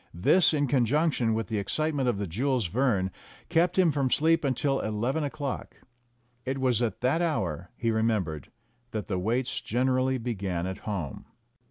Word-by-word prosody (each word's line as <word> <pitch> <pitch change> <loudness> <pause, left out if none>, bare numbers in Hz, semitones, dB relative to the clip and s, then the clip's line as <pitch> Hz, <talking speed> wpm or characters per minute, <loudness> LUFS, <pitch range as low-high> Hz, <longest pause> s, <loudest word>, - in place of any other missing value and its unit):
This, 170 - +4
in 145 -2 +1
conjunction 130 -2 +2
with 110 0 -2
the 110 -3 -1
excite 155 +10 -1
ment 135 -3 +1
of 115 - 0
the 100 - -2
Jules 120 - 0
Verne, 100 -2 +1 0.4
kept 175 +2 +2
him 180 -4 +5
from 140 -3 0
sleep 165 +4 +3
until 135 0 +1
eleven 120 +8 -1
o'clock. 145 -2 -4 0.7
It 130 +2 -2
was 125 -3 +1
at 115 -2 -1
that 135 +7 +2
hour, 90 - -1
he 115 -1 0
remembered, 105 -10 -1 0.4
that 110 -2 -3
the 95 - -2
waits 120 +7 -1
generally 130 +2 +1
began 100 -8 -3
at 95 +2 -4
home. 90 -9 -4
125 Hz, 165 wpm, -28 LUFS, 105-140 Hz, 0.7 s, him